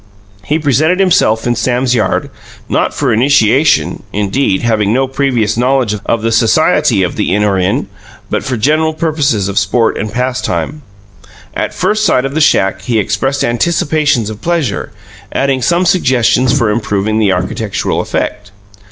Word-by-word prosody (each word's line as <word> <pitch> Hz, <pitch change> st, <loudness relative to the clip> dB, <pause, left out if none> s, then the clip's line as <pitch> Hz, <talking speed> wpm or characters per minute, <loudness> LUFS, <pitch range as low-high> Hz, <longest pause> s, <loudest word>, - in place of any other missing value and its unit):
He 150 Hz, -, 0 dB
presented 155 Hz, +4 st, +1 dB
himself 110 Hz, -, +2 dB
in 120 Hz, -, +1 dB
Sam's 125 Hz, +2 st, 0 dB
yard, 110 Hz, -5 st, -1 dB, 0.4 s
not -, -, 0 dB
for 135 Hz, -5 st, -1 dB
initiation, 135 Hz, +3 st, +2 dB
indeed 105 Hz, +1 st, -1 dB
having 110 Hz, -3 st, +1 dB
no 130 Hz, +3 st, +1 dB
previous 125 Hz, -5 st, 0 dB
knowledge 125 Hz, -2 st, +1 dB
of 115 Hz, -1 st, 0 dB
the 115 Hz, -, 0 dB
Society 120 Hz, -, +2 dB
of 90 Hz, -, -3 dB
the -, -, -1 dB
In 105 Hz, -, +1 dB
Or 100 Hz, -2 st, +1 dB
In 90 Hz, +1 st, 0 dB, 0.4 s
but -, -, -2 dB
for 130 Hz, -2 st, -3 dB
general 155 Hz, +7 st, +1 dB
purposes 150 Hz, -, 0 dB
of 100 Hz, 0 st, 0 dB
sport 110 Hz, +3 st, 0 dB
and 110 Hz, -, -4 dB
pastime. 130 Hz, +4 st, -2 dB, 0.7 s
At -, -, -3 dB
first 215 Hz, 0 st, 0 dB
sight 135 Hz, -10 st, +2 dB
of 135 Hz, -, -4 dB
the 160 Hz, -, 0 dB
shack 95 Hz, -9 st, +2 dB
he 120 Hz, -3 st, -1 dB
expressed 135 Hz, +6 st, -1 dB
anticipations 145 Hz, -2 st, 0 dB
of 105 Hz, 0 st, -10 dB
pleasure, 165 Hz, -10 st, -2 dB, 0.4 s
adding 135 Hz, -1 st, 0 dB
some 175 Hz, +8 st, +1 dB
suggestions 130 Hz, -7 st, +2 dB
for 115 Hz, -5 st, +1 dB
improving 105 Hz, -1 st, -1 dB
the 105 Hz, -3 st, +2 dB
architectural 95 Hz, +3 st, -2 dB
effect. 105 Hz, 0 st, -4 dB
125 Hz, 155 wpm, -13 LUFS, 110-145 Hz, 0.7 s, himself